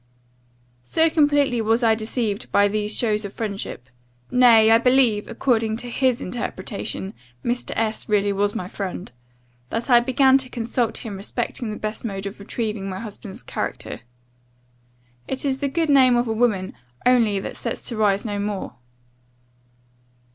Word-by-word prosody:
"So 320 - +2
completely 290 -6 +3
was 225 +2 +1
I 225 -1 +5
deceived 220 -1 -3
by 205 0 +4
these 210 +1 0
shows 215 -2 +1
of 200 -1 -6
friendship 200 - -5 0.4
(nay, 230 -3 +6
I 225 - +7
believe, 250 -4 +3
according 225 -4 0
to 245 +1 -7
his 255 -1 +1
interpretation, 195 -2 -4 0.3
Mr. 240 +1 -1
S 220 -1 -2
really 205 -1 +2
was 205 +1 0
my 180 -5 -3
friend) 185 -4 -5 0.6
that 230 +3 -3
I 240 - +8
began 265 +2 +4
to 260 -1 -4
consult 235 0 -2
him 205 -3 -5
respecting 230 +3 -4
the 210 - -4
best 215 0 -4
mode 195 -4 -4
of 200 +1 -6
retrieving 210 -1 -3
my 185 0 -5
husband's 210 -2 -8
character: - - -5 1.3
it 265 +2 -3
is 270 -1 0
the 285 - 0
good 320 +2 0
name 260 -3 +6
of 240 0 +1
a 225 - 0
woman 215 -5 +1 0.3
only 230 -5 +4
that - - -6
sets - - -5
to 235 - -4
rise 205 -1 +2
no 205 -2 -2
more. 200 -10 -4
225 Hz, 155 wpm, -23 LUFS, 205-245 Hz, 1.3 s, I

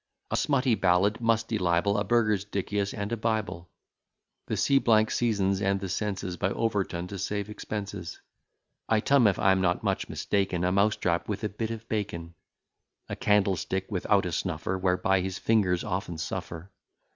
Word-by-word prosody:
A - - +1
smutty 135 -4 +2
ballad, 100 +2 +2
musty 115 -1 +1
libel, 90 +3 +2
A - - 0
Burgersdicius 100 -2 0
and 100 0 -4
a - - +1
Bible. 110 -6 -2 0.8
The - - -2
C 140 -1 +3 0.3
Seasons 100 -4 +1
and 100 0 +1
the 95 -1 -5
Senses 95 -2 -3
By 95 - 0
Overton, 100 -6 -1
to 100 - -6
save 100 +2 -3
expenses. 100 -5 -6 0.7
Item, 115 +3 +4
(if 100 - +2
I 95 - +4
am 95 0 +2
not 90 -1 +1
much - - -1
mistaken,) 95 -3 -1
A 90 - +2
mouse 100 +2 +3
trap 85 +2 -1
with 105 0 -3
a 105 - 0
bit 110 +2 -4
of 115 0 -6
bacon. 85 -6 -3 0.8
A - - -3
candlestick 95 -1 +1
without 100 +1 +2
a 90 - -2
snuffer, 90 +3 -2
Whereby 95 0 +1
his 95 +1 -3
fingers 95 -6 +2
often 95 -4 -3
suffer. 85 +3 -5
100 Hz, 160 wpm, -28 LUFS, 90-110 Hz, 0.8 s, Item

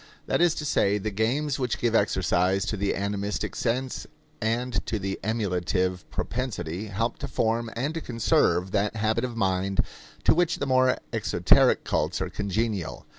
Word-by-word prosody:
That - - +1
is 175 -2 +4
to 150 - -4
say, 105 -8 +2
the 105 +1 -3
games 130 +8 0
which 125 -2 -1
give 120 -2 0
exercise 95 -2 +2
to - - -2
the 100 0 0
animistic 100 +1 -2
sense 125 +2 -2 0.3
and 115 0 0
to 110 - 0
the 95 -1 -3
emulative 95 -4 -1
propensity 105 -6 -3
help 115 +4 -2
to - - -4
form 115 +1 0
and 135 +7 -1
to 165 - -4
conserve 95 - +2
that 105 +1 0
habit 110 +2 +1
of 120 -2 -3
mind 95 -1 +1 0.4
to - - +5
which 170 0 +2
the 140 - -2
more 130 -1 +3 0.2
exoteric - - +4
cults - - 0
are - - -3
congenial. 105 -2 -2
110 Hz, 165 wpm, -26 LUFS, 95-125 Hz, 0.4 s, to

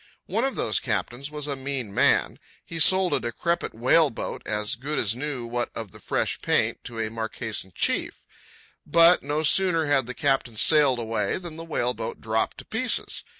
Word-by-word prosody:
One 230 - -1
of 270 0 -1
those 110 - +1
captains 120 +5 -3
was 150 -1 -4
a 145 -1 -2
mean 130 -6 -4
man. - - +2 0.3
He 165 - -6
sold 185 +3 +5
a - - +2
decrepit 145 +8 -2
whale 130 +7 +4
boat, 115 - -6
as 105 +1 -1
good 140 +5 -4
as 110 0 +1
new 135 -2 -4
what 120 +1 -2
of 110 -4 -6
the - - -14
fresh - - -1
white - - -29
paint, - - +1
to 120 - -7
a 110 -1 -2
Marquesan 110 -3 -4
chief. - - -1 0.6
But 170 +1 +5
no 145 +2 -2
sooner 165 0 +4
had 140 -4 +2
the 125 - -6
captain 135 -6 0
sailed 145 -1 +4
away 115 -1 -1
than 175 -3 -8
the 165 - -8
whale 125 -7 -1
boat 115 0 -6
dropped 110 0 -1
to - - -10
pieces. - - -1
130 Hz, 195 wpm, -25 LUFS, 115-155 Hz, 0.6 s, sold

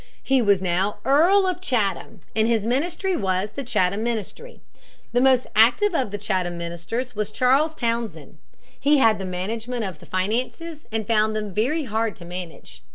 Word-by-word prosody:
He 265 -1 +3
was 200 -4 +3
now 185 +3 0
Earl 350 +9 +5
of 365 -1 -2
Chatham, 225 - -1
and 220 0 +3
his 225 -3 +1
ministry 340 - 0
was 190 - -1
the 275 +6 -5
Chatham 200 -4 +1
Ministry. 235 - -4 0.5
The 245 +1 +2
most 260 -1 +4
active 250 - +4
of 265 -9 0
the 205 - -4
Chatham 185 -4 -2
ministers 170 +9 -5
was 210 0 -2
Charles 270 +7 +2
Townshend. 235 -3 -3 0.4
He 290 +1 +4
had 225 -5 +4
the 190 - -4
management 220 +6 -3
of 190 -5 -5
the - - -15
finances 250 - -3
and 220 -1 -2
found 215 0 +2
them 210 -2 -4
very 265 - 0
hard 220 -3 -1
to 170 - -12
manage. 170 - -9
225 Hz, 170 wpm, -23 LUFS, 195-265 Hz, 0.5 s, Earl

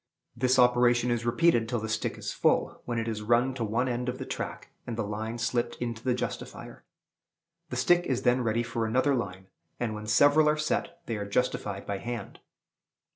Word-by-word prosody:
This 130 +2 +2
operation 125 -1 +4
is 120 0 -1
repeated 120 -3 +3
till 120 - 0
the 110 - -4
stick 110 - -2
is - - -4
full, - - +1
when 120 -1 -2
it 115 0 -1
is 110 -2 -3
run 120 +4 +2
to 125 -3 -3
one 115 +4 0
end 125 0 -1
of 125 - -4
the - - -5
track, - - -5 0.2
and 115 -2 -4
the 115 - 0
line 110 +3 -4
slipped 120 0 -1
into 115 -2 -4
the 125 -2 +1
justifier. 125 -1 -6 0.9
The - - -4
stick 175 0 +3
is 130 0 -1
then 125 +1 +3
ready 115 0 +1
for 115 -1 -2
another 130 +5 +2
line; 95 -7 -3 0.3
and, 115 -3 -1
when 105 0 -7
several 145 +7 +5
are 150 - +2
set, 170 +2 -2
they 115 - -3
are 100 -1 -4
justified 100 -3 -1
by 100 -1 -3
hand. 120 -1 -6
120 Hz, 200 wpm, -28 LUFS, 110-125 Hz, 0.9 s, several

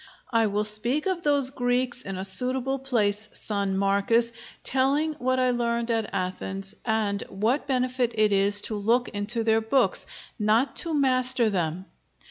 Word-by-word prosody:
"I 225 -2 +2
will 205 +1 -1
speak 225 +7 +1
of 375 -3 -1
those 285 -4 +2
Greeks 250 -1 -1
in 195 -1 -6
a 190 - -3
suitable 255 +7 +2
place, 215 -5 -1
son 200 -2 -1
Marcus, 200 +4 +2 0.3
telling 280 +4 +1
what 255 +1 0
I 255 -1 +2
learned 235 -1 -1
at 225 -2 -1
Athens, 195 +1 -4
and 215 -3 -1
what 230 +9 -1
benefit 255 -2 0
it 215 -1 +3
is 200 +1 +3
to 220 - -1
look 230 +5 +1
into 210 +3 -2
their 225 0 +2
books, 270 - +1 0.3
not 220 +5 +1
to 330 -3 0
master 255 -4 +3
them. 175 -1 -2
230 Hz, 155 wpm, -25 LUFS, 205-255 Hz, 0.3 s, it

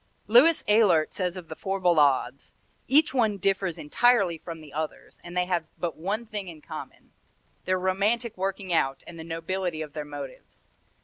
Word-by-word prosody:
Louis 255 +10 +6
Ehlert 205 -7 +4
says 180 -1 -2
of 175 -3 -9
the 160 - -7
four 195 +3 -3
Ballades: 145 -7 +2 0.3
"Each 290 +2 +4
one 220 -6 +2
differs 195 -2 0
entirely 190 0 +2
from 165 0 -8
the 150 -3 -13
others, 155 +1 -5
and 175 +1 -7
they 180 - +2
have 175 -3 -1
but 170 -2 -3
one 200 +8 -3
thing 210 -3 -5
in 165 -3 -9
common - - -10 0.5
their 185 0 +1
romantic 205 +5 0
working 190 -1 -3
out 135 -4 +1
and 165 -1 -10
the - - -6
nobility 165 0 -3
of 150 -2 -10
their 150 - -4
motives. 145 -2 -10
180 Hz, 175 wpm, -26 LUFS, 160-200 Hz, 0.5 s, Louis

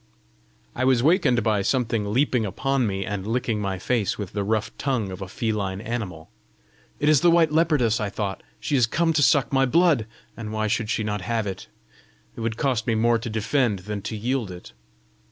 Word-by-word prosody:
I 130 - -1
was 130 -2 +3
wakened 145 - +3
by 105 -2 +2
something 115 -2 0
leaping 125 0 +2
upon 130 +5 0
me, 95 -1 -2
and 100 -1 -4
licking 115 -2 -1
my 95 -2 -2
face 105 +2 -1
with 100 -4 -6
the 100 -1 -1
rough 110 +1 -1
tongue 125 -8 -1
of 95 - -8
a 95 - -5
feline 100 -2 -2
animal. 105 -8 -5 0.7
"It 150 - 0
is 150 -3 +5
the 175 - +5
white 165 -2 +4
leopardess!" 150 -8 +2
I 105 -2 -1
thought. 100 -1 -4 0.2
"She 145 - -1
is 125 -4 +4
come 165 +6 +1
to 150 - +2
suck 140 -1 +3
my 135 0 +3
blood! 155 -6 +3 0.3
and 110 -2 -6
why 110 0 -1
should 110 0 -1
she 110 - 0
not 105 -1 -2
have 110 +3 -1
it? 95 -2 -6 0.7
it - - -7
would 115 0 -2
cost 125 -5 0
me 115 - +2
more 115 +1 +3
to 115 - -5
defend 110 -1 0
than 105 -1 -4
to 110 - -5
yield 120 0 -1
it!" 90 -6 -10
115 Hz, 205 wpm, -24 LUFS, 105-130 Hz, 0.7 s, is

